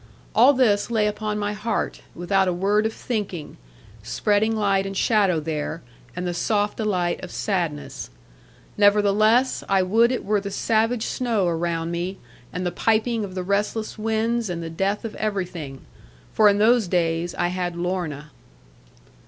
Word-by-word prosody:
All 250 +6 +6
this 230 -6 +2
lay 220 -3 +2
upon 210 0 -2
my 205 0 -2
heart, 210 +3 -3
without 190 +2 +1
a 180 - +1
word 205 +4 +2
of - - -4
thinking, 200 -11 -4 0.4
spreading 205 - +1
light 195 -2 +1
and 195 0 -5
shadow 200 -7 +3
there, 155 +1 -4 0.3
and 180 +1 -3
the 175 - -1
soft 205 +3 0
delight 185 -6 -1
of 185 - -6
sadness. 175 -9 -3 0.7
Nevertheless, 210 +4 +4
I 195 -1 +3
would 225 +6 +3
it 255 - -3
were 205 0 +1
the 200 - -5
savage 225 +3 0
snow 230 -6 0
around 165 0 -1
me, 175 +3 -3 0.3
and 180 +1 -4
the 175 - 0
piping 225 +4 +1
of 190 -2 -7
the 185 - -2
restless 205 +3 -1
winds, 225 +1 0
and 170 -1 -4
the 165 - -6
death 195 +6 -1
of 225 - -5
everything. 180 -10 -4 0.5
For 215 -1 +6
in 200 - +2
those 225 0 +4
days 170 -1 0
I 175 - 0
had 180 -1 -3
Lorna. 170 -5 -3
200 Hz, 160 wpm, -23 LUFS, 175-215 Hz, 0.7 s, All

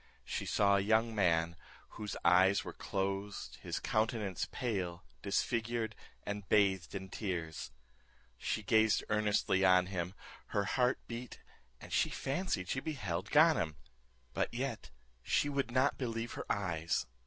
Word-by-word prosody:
She - - -3
saw 100 -1 +4
a - - +3
young 110 +3 +2
man, 85 -4 +2 0.3
whose 105 -2 -6
eyes 95 +3 +5
were - - -7
closed, 100 0 -3
his - - -3
countenance 110 -3 0
pale, 95 -8 -2 0.2
disfigured, 115 -1 0 0.3
and 105 -1 -5
bathed 95 -4 +3
in 95 -1 -4
tears. 85 -7 -4 0.7
She 110 - -2
gazed 110 +2 +4
earnestly 105 -2 +2
on 90 -1 +6
him, 90 -1 -3 0.3
her 100 - 0
heart 125 +2 +2
beat, 120 +1 -7 0.4
and - - -9
she - - +3
fancied 135 - -2
she 130 - 0
beheld 100 - -3
Ganem; 150 - +4 0.6
but - - 0
yet 125 -1 -3 0.3
she 145 - +1
would 140 -2 -1
not 130 +3 +2
believe 115 -2 -2
her - - -4
eyes. 85 -8 0
105 Hz, 135 wpm, -34 LUFS, 95-115 Hz, 0.7 s, on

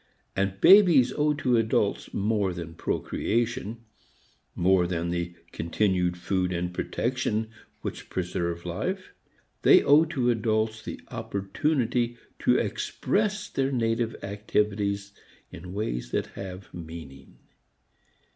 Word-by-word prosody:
And 95 0 -1
babies 170 - +7
owe 150 0 +2
to 125 -4 +2
adults 110 -2 +1
more 100 -2 0
than 85 -2 -7
procreation, 115 +5 -2 0.7
more 90 0 +3
than 85 -1 -2
the 85 0 -3 0.2
continued 90 0 0
food 90 0 0
and 90 0 -2
protection 110 +1 -1 0.3
which - - -6
preserve 85 -2 -2
life. - - -3 0.5
They - - +7
owe 150 +3 +6
to 130 -7 +1
adults 110 -1 0
the - - -7
opportunity 120 +3 -1 0.2
to - - +3
express 210 0 -1
their 135 -7 -1
native 115 -2 0
activities 100 0 -1 0.4
in 90 - -9
ways - - -3
which - - 0
have 95 -1 -8
meaning. 80 -6 -10
105 Hz, 110 wpm, -27 LUFS, 90-120 Hz, 0.7 s, babies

